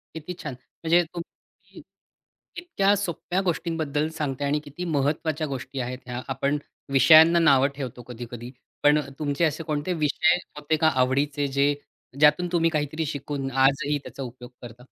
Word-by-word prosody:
किती 160 +3 -6
छान, 150 -4 -4 0.3
म्हणजे, 170 +2 +4
तुम्ही 170 -1 -12 0.8
इतक्या 205 - +1
सोप्या 185 -1 -2
गोष्टींबद्दल 160 -3 -1
सांगताय 140 -2 -2
आणि 150 +2 +1
किती 145 +5 -7
महत्त्वाच्या 155 +2 0
गोष्टी 135 0 -5
आहेत 125 0 -4
ह्या. 125 0 -5
आपण 140 +2 0 0.4
विषयांना 160 +6 +7
नावं 140 -5 +5
ठेवतो 125 -3 -6
कधी-कधी. 120 0 -8 0.3
पण 145 +1 +6
अ, 140 -2 -6
तुमचे 145 +2 +1
असे 160 +1 -2
कोणते 155 +3 -2
विषय 160 +3 +3 0.2
होते 150 +2 0
का 160 - +5 0.2
आवडीचे, 140 +2 0
जे 140 +1 +2 0.5
ज्यातून 150 +4 +5
तुम्ही 165 -2 +3
काहीतरी 155 +1 -2
शिकून 140 -2 -4
आजही 140 +3 +2
त्याचा 135 - -7
उपयोग 125 0 -10
करता? 120 +1 -11
145 Hz, 150 wpm, -25 LUFS, 135-160 Hz, 0.8 s, विषयांना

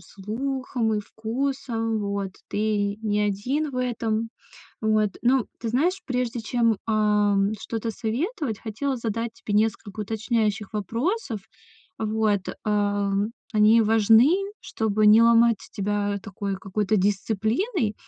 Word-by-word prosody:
слухом 240 +3 -3
и 210 - 0
вкусом, 225 0 -2
вот 200 -2 -3 0.2
ты 205 -1 0
не 210 -1 +1
один 245 +10 -1
в 255 - -7
этом 230 -3 -1 0.5
вот. 215 -2 +2
Ну 250 0 +3
ты 235 - -4
знаешь, 335 - +1
прежде 250 -2 -1
чем, 230 0 +1
ам, 210 -2 +2
что-то 225 +2 -3
советовать, 240 - -2
хотела 255 +6 -3
задать 230 0 -3
тебе 205 - -5
несколько 215 -1 0
уточняющих 220 0 -1
вопросов. 230 - -2 0.6
Вот, 215 -2 +1 0.2
ам, 205 -1 +1 0.3
они 215 +1 +5
важны, 225 +4 +5 0.3
чтобы 215 -1 0
не 215 +2 +8
ломать 230 0 +5 0.2
тебя 205 0 -1
такой 200 -1 -4
какой-то 200 +2 -1
дисциплиной, 215 - 0
220 Hz, 115 wpm, -25 LUFS, 205-235 Hz, 0.6 s, не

